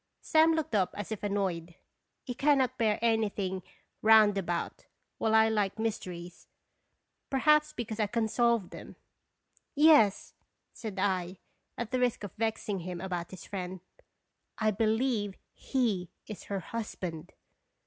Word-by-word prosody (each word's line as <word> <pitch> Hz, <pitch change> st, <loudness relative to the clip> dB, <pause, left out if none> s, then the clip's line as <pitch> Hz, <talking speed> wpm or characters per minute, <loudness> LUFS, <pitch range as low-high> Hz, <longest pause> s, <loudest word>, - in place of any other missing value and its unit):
Sam 320 Hz, +1 st, +4 dB
looked 315 Hz, -1 st, -2 dB
up 195 Hz, -4 st, +1 dB
as 205 Hz, +1 st, -5 dB
if 215 Hz, -, -4 dB
annoyed. 185 Hz, -5 st, -2 dB, 0.5 s
He 250 Hz, -, -4 dB
cannot 275 Hz, -1 st, +2 dB
bear 215 Hz, -2 st, +2 dB
anything 205 Hz, -5 st, 0 dB, 0.4 s
roundabout, 205 Hz, -5 st, +3 dB, 0.3 s
while 220 Hz, 0 st, +2 dB
I 220 Hz, 0 st, +6 dB
like 210 Hz, -2 st, 0 dB
mys 220 Hz, -1 st, -1 dB
teries. 175 Hz, -1 st, -9 dB, 0.8 s
Perhaps 300 Hz, +2 st, +3 dB
because 225 Hz, -2 st, -5 dB
I 210 Hz, -, +2 dB
can 225 Hz, +1 st, 0 dB
solve 235 Hz, -3 st, +1 dB
them. -, -, -10 dB, 0.4 s
" -, -, -40 dB, 0.2 s
Yes," 215 Hz, -10 st, +4 dB, 0.4 s
said 215 Hz, -4 st, -7 dB
I, 185 Hz, -2 st, -1 dB, 0.4 s
at 235 Hz, -2 st, -4 dB
the 255 Hz, -, +1 dB
risk 245 Hz, -3 st, 0 dB
of 200 Hz, -, -6 dB
vexing 220 Hz, -3 st, -2 dB
him 180 Hz, 0 st, -6 dB
about 175 Hz, -2 st, -4 dB
his 185 Hz, -, -10 dB
friend, 185 Hz, -2 st, -5 dB, 0.5 s
"/ 215 Hz, -1 st, -3 dB
believe 220 Hz, -2 st, +1 dB, 0.2 s
he 215 Hz, -10 st, -1 dB, 0.2 s
is 210 Hz, -, -9 dB
her 200 Hz, -1 st, -3 dB
hus 230 Hz, +4 st, -5 dB
band." 165 Hz, -4 st, -6 dB
210 Hz, 140 wpm, -30 LUFS, 190-230 Hz, 0.8 s, I